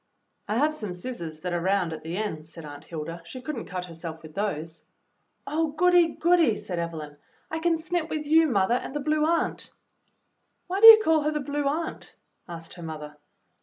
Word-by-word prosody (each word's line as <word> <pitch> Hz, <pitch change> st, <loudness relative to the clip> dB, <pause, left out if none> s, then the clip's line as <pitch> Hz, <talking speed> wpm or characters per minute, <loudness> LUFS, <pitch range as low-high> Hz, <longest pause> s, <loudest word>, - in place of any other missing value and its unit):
"I 210 Hz, +2 st, -1 dB
have 300 Hz, +4 st, +2 dB
some 215 Hz, -11 st, -5 dB
scissors 175 Hz, -6 st, -7 dB
that 180 Hz, -1 st, -3 dB
are 175 Hz, -, -1 dB
round 185 Hz, -2 st, +1 dB
at 160 Hz, -, -7 dB
the 165 Hz, +3 st, -5 dB
ends," 160 Hz, -7 st, -4 dB
said 165 Hz, -, -10 dB
Aunt 145 Hz, +1 st, -10 dB
Hilda; 165 Hz, +1 st, -6 dB
"she 255 Hz, +10 st, -9 dB
could 275 Hz, +4 st, -5 dB
n't 230 Hz, -, -6 dB
cut 180 Hz, 0 st, -4 dB
herseK 165 Hz, -1 st, -8 dB
with 155 Hz, -1 st, -11 dB
those." 165 Hz, -5 st, -4 dB, 0.6 s
"Oh, 310 Hz, +1 st, -1 dB
goody, 350 Hz, 0 st, +4 dB
goody!" 335 Hz, -9 st, +3 dB
said 180 Hz, -4 st, -5 dB
Evelyn. 155 Hz, -3 st, -5 dB, 0.3 s
"I 320 Hz, -, -2 dB
can 330 Hz, 0 st, +2 dB
snip 330 Hz, 0 st, -2 dB
with 305 Hz, -1 st, -3 dB
you, 320 Hz, +2 st, +5 dB
mother, 200 Hz, -4 st, +2 dB
and 250 Hz, +3 st, -3 dB
the -, -, 0 dB
Blue 305 Hz, +1 st, +1 dB
Aunt." 335 Hz, 0 st, -1 dB, 1.0 s
"Why 380 Hz, +2 st, -3 dB
do 450 Hz, -, +11 dB
you 445 Hz, -1 st, +13 dB
call 320 Hz, -3 st, +3 dB
her 300 Hz, +1 st, 0 dB
the 300 Hz, -, -2 dB
Blue 290 Hz, 0 st, -2 dB
Aunt.?" 320 Hz, +4 st, -3 dB, 0.3 s
asked 165 Hz, -1 st, -8 dB
her 175 Hz, -, -11 dB
mother. 150 Hz, -2 st, -7 dB
215 Hz, 205 wpm, -26 LUFS, -, 1.0 s, you